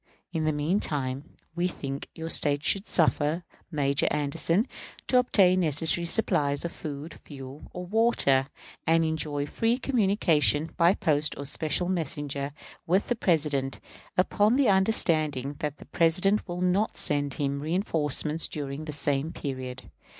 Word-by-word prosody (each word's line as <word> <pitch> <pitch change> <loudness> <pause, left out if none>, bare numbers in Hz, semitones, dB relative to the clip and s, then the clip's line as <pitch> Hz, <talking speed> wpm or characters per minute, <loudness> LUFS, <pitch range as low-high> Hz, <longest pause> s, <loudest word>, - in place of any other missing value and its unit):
In 160 -2 -1
the 155 - +2
mean 155 +7 0
time, 135 -3 -3 0.2
we 175 +1 +1
think 140 -5 -6
your 165 0 -5
State 145 -1 +2
should 195 +4 +2
suffer 160 0 +2 0.3
Major 140 -3 0
Anderson 150 - +1 0.4
to 250 - +4
obtain 190 -7 +4
necessary 165 +1 +3
supplies 145 -7 +1
of 170 - -3
food, 150 +1 -7
fuel, 135 0 -10
or 180 0 -6
water, 180 - +2 0.4
and 165 0 +3
enjoy 150 -2 -1
free 225 +10 0
communication, 190 - +2
by 170 +3 +4
post 150 -1 0
or 140 - -6
special 155 +4 -1
messenger, 145 -5 -3 0.4
with 185 +4 +1
the 245 - +1
President; 150 - 0 0.4
upon 205 +5 +3
the 270 -4 +3
understanding 155 - +2
that 150 -3 -3
the - - -13
President 180 +6 +2
will 175 0 -5
not 185 +4 +1
send 145 -2 +1
him 140 -1 -2
reënforcements 155 -2 0
during 145 0 -5
the 155 - -5
same 145 +1 -1
period. 130 - -6
155 Hz, 145 wpm, -27 LUFS, 145-180 Hz, 0.4 s, to